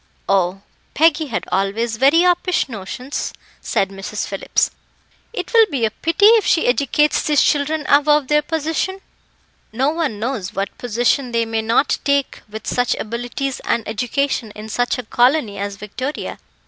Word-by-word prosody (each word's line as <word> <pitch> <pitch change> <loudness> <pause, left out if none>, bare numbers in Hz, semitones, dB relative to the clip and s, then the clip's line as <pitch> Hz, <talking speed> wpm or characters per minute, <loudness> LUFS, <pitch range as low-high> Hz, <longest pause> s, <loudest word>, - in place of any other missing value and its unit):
"Oh! 195 0 +1 0.3
Peggy 315 0 +3
had 230 - -3
always 220 +4 0
very 280 +7 +5
uppish 360 0 +2
notions," 250 +4 -5 0.3
said 195 - 0
Mrs. 195 +2 -5
Phillips, 195 - 0 0.6
"it 470 - -5
will 455 -1 +6
be 265 -7 0
a 220 - -1
pity 330 - +1
if 445 0 +7
she 325 - +3
educates 280 +4 +2
these 295 -1 +3
children 300 +1 +1
above 295 -1 +4
their 300 +1 +3
position." 320 +5 -2 0.7
"No 260 +6 +1
one 315 -9 -2
knows 215 -4 -3
what 195 0 -3
position 245 +2 0
they 230 0 +2
may 225 0 -1
not 230 +5 +1
take 280 -1 0
with 220 +1 -8
such 245 0 0
abilities 245 +4 -4
and 235 -2 -1
education 245 +2 -1
in 215 +1 -8
such 245 +4 0
a 250 - -4
colony 240 -2 +1
as 200 0 -3
Victoria. 230 +8 -5
250 Hz, 155 wpm, -19 LUFS, 220-300 Hz, 0.7 s, if